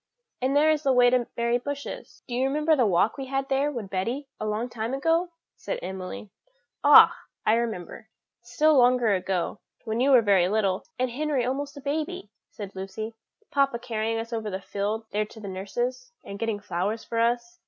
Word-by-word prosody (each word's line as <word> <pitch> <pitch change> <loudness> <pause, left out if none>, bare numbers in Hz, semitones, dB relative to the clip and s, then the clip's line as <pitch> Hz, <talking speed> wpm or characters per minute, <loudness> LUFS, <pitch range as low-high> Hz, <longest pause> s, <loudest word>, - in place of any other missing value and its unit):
And 265 +2 +1
there 310 +2 +5
is 305 -1 +1
the 275 -3 +2
way 245 -1 +5
to 250 -2 +2
Mary 235 +1 +1
Bush's." 285 +2 -7
"Do 245 - -6
you 255 +2 +1
remember 305 +3 +2
the 250 -6 +3
walk 200 +7 +2
we 270 - -5
had 270 0 -1
there 275 +2 +1
with 225 -8 -6
Betty 235 +9 -2
a 215 - -3
long 215 +3 -1
time 235 +1 -3
ago?" 330 +5 +1 0.3
said - - -4
Emily. 190 +2 -6 0.5
"Ah! - - +9 0.3
I - - +4
can 230 - +4
remember, 220 -1 -5 0.3
still 295 +6 +2
longer 245 -4 +4
ago, 185 +1 -1 0.2
when 220 +1 -2
you 265 +3 +3
were 255 -4 +6
very 190 -4 +4
little, 200 -3 0
and 255 -1 0
Henry 285 -1 0
almost 280 +3 -3
a - - -8
baby," 285 -7 -3 0.2
said 200 -2 -9
Lucy, 205 +4 -5 0.4
"papa 275 -3 +2
carrying 225 -1 -2
us 230 +1 -5
over 220 -2 -2
the 190 -1 -4
field 205 +3 -3
there 210 +1 0
to 220 - -13
nurse's, 240 +6 -4
and 200 0 -7
getting 225 -2 -1
flowers 205 +3 -2
for 230 - -3
us." 240 +10 0
235 Hz, 195 wpm, -26 LUFS, 210-270 Hz, 0.5 s, Ah